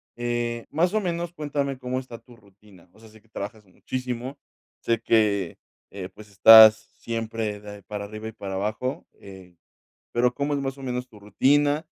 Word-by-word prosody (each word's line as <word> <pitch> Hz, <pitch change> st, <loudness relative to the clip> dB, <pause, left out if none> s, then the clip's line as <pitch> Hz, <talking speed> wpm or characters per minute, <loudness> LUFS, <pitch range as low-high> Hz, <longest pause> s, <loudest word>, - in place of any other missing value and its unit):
Eh, 120 Hz, -1 st, -2 dB
más 175 Hz, +5 st, +1 dB
o 215 Hz, -, +2 dB
menos 175 Hz, -2 st, -3 dB
cuéntame 140 Hz, -3 st, -3 dB
cómo 130 Hz, 0 st, -3 dB
está 120 Hz, -3 st, -10 dB
tu 120 Hz, -, -18 dB
rutina, 100 Hz, -4 st, -21 dB
o 110 Hz, -, -21 dB
sea, 110 Hz, -1 st, -16 dB
sé 110 Hz, -, -18 dB
que 115 Hz, -, -31 dB
trabajas 105 Hz, 0 st, -7 dB
muchísimo, 125 Hz, +6 st, -5 dB, 0.4 s
sé 115 Hz, -1 st, 0 dB
que, 105 Hz, -6 st, +1 dB, 0.3 s
eh, 95 Hz, -2 st, -7 dB
pues, 105 Hz, -1 st, -14 dB
estás 110 Hz, +2 st, +9 dB, 0.2 s
siempre 115 Hz, -2 st, -4 dB
de 105 Hz, -1 st, -10 dB
para 105 Hz, -1 st, -6 dB
arriba 110 Hz, +1 st, -8 dB
y -, -, -6 dB
para 100 Hz, -3 st, -7 dB
abajo, 110 Hz, +7 st, -3 dB
eh, 95 Hz, -3 st, -14 dB, 0.6 s
pero, 125 Hz, +1 st, +2 dB
¿cómo 145 Hz, +2 st, -2 dB
es -, -, -1 dB
más 135 Hz, 0 st, -4 dB
o -, -, -11 dB
menos 125 Hz, 0 st, -3 dB
tu 110 Hz, -4 st, -17 dB
rutina 145 Hz, -, +2 dB
115 Hz, 180 wpm, -25 LUFS, 105-130 Hz, 0.6 s, estás